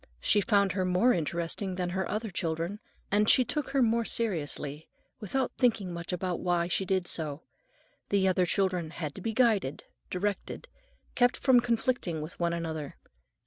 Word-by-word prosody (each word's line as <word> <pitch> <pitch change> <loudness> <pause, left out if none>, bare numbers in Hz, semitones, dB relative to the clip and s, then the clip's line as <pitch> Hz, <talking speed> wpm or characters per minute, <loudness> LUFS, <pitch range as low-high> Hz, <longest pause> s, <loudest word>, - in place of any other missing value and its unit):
She 205 - +3
found 200 -1 +3
her 185 +1 -1
more 185 +7 +3
interesting 170 +3 -2
than 180 -1 -2
her 190 0 -2
other 215 0 -3
children, 170 +3 -2 0.3
and 210 +1 +3
she 255 - +6
took 300 +1 -2
her 270 -1 +3
more 230 0 +2
seriously, 155 -9 -2 0.3
without 250 +4 -1
thinking 220 -8 +2
much 170 +1 -5
about 180 0 -2
why 175 -1 +1
she 190 +2 0
did 185 -1 0
so. 155 -1 -2 0.7
The 195 -1 +3
other 185 -1 +2
children 185 -4 0
had 155 -3 -5
to 195 - -8
be 225 - -1
guided, 215 - +2 0.3
directed, 200 +2 -3 0.5
kept 245 0 +3
from 260 -3 +5
conflicting 235 -7 0
with 155 +3 -7
one 170 -1 +1
another. 160 -4 -4
185 Hz, 165 wpm, -29 LUFS, 170-220 Hz, 0.7 s, she